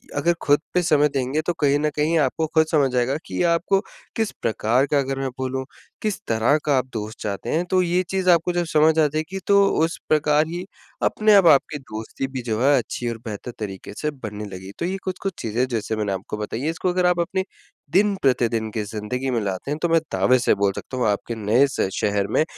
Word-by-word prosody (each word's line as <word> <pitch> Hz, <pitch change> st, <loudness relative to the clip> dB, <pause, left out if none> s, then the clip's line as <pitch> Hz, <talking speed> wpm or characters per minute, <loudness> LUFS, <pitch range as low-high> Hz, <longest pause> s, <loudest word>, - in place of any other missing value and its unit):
अगर 170 Hz, +4 st, +2 dB
खुद 145 Hz, 0 st, +3 dB
पे 180 Hz, -, +3 dB
समय 150 Hz, -3 st, +4 dB
देंगे, 135 Hz, +3 st, 0 dB
तो 175 Hz, +2 st, -1 dB
कहीं 145 Hz, -1 st, +3 dB
न 150 Hz, +1 st, +1 dB
कहीं 155 Hz, +3 st, +1 dB
आपको 155 Hz, +3 st, +1 dB
खुद 160 Hz, 0 st, +5 dB
समझ 135 Hz, -5 st, +2 dB
आएगा 125 Hz, +3 st, +1 dB
कि -, -, -3 dB
आपको 170 Hz, +3 st, +2 dB, 0.4 s
किस 220 Hz, -2 st, 0 dB
प्रकार 115 Hz, +4 st, +2 dB
का 145 Hz, -, +4 dB
अगर 135 Hz, 0 st, -2 dB
मैं 135 Hz, -1 st, -1 dB
बोलूँ, 130 Hz, 0 st, -2 dB, 0.4 s
किस 210 Hz, -2 st, -1 dB
तरह 115 Hz, +6 st, +3 dB
का 145 Hz, -2 st, +3 dB
आप 130 Hz, -, +1 dB
दोस्त 110 Hz, 0 st, -5 dB
चाहते 100 Hz, -2 st, -4 dB
हैं, 170 Hz, +3 st, 0 dB
तो 185 Hz, -, +4 dB
ये 180 Hz, +1 st, +1 dB
चीज़ 190 Hz, -1 st, 0 dB
आपको 175 Hz, 0 st, +4 dB
जब 175 Hz, 0 st, 0 dB
समझ 155 Hz, +1 st, +4 dB
आजाएगी, 155 Hz, +5 st, 0 dB
तो 200 Hz, 0 st, +5 dB, 0.2 s
उस 165 Hz, -, -5 dB
प्रकार 150 Hz, 0 st, +3 dB
ही 175 Hz, +2 st, -5 dB, 0.4 s
अपने 215 Hz, -1 st, +3 dB
आप 190 Hz, -4 st, +6 dB
आपकी 145 Hz, +1 st, +4 dB
दोस्ती 110 Hz, +1 st, -6 dB
भी 130 Hz, -1 st, -5 dB
जो 115 Hz, -1 st, -2 dB
है, 140 Hz, +1 st, +5 dB
अच्छी 120 Hz, 0 st, -3 dB
और 115 Hz, -, -4 dB
बेहतर 110 Hz, +3 st, -6 dB
तरीके 100 Hz, -2 st, -6 dB
से 150 Hz, 0 st, 0 dB
बनने 105 Hz, -6 st, -7 dB
लगेगी। 95 Hz, 0 st, -8 dB
तो 170 Hz, -, -1 dB
ये 190 Hz, +2 st, -2 dB
कुछ-कुछ 190 Hz, 0 st, -3 dB
चीज़ें 115 Hz, +3 st, 0 dB
जैसे 115 Hz, -3 st, -2 dB
मैंने 105 Hz, -2 st, -1 dB
आपको 95 Hz, +2 st, -5 dB
बताई 105 Hz, +3 st, -4 dB
हैं, 155 Hz, -, 0 dB
इसको 165 Hz, +2 st, -1 dB
अगर 180 Hz, 0 st, +1 dB
आप 180 Hz, -1 st, +3 dB
अपनी 185 Hz, +2 st, 0 dB, 0.5 s
दिन-प्रतिदिन 130 Hz, -, +2 dB
की 110 Hz, -1 st, -2 dB
ज़िंदगी 110 Hz, +5 st, -4 dB
में 120 Hz, -2 st, 0 dB
लाते 100 Hz, +7 st, -3 dB
हैं, 150 Hz, -, -1 dB
तो 170 Hz, -, +1 dB
मैं 165 Hz, 0 st, +4 dB
दावे 130 Hz, 0 st, +3 dB
से 120 Hz, -, +3 dB
बोल 100 Hz, -, +4 dB
सकता 130 Hz, -, -6 dB
हूँ, 125 Hz, -, +1 dB
आपके 105 Hz, +3 st, -1 dB
नए 110 Hz, +6 st, +3 dB
स 135 Hz, -, -7 dB
शहर 100 Hz, -1 st, 0 dB
में, 110 Hz, -, +2 dB
135 Hz, 225 wpm, -23 LUFS, 115-165 Hz, 0.5 s, आप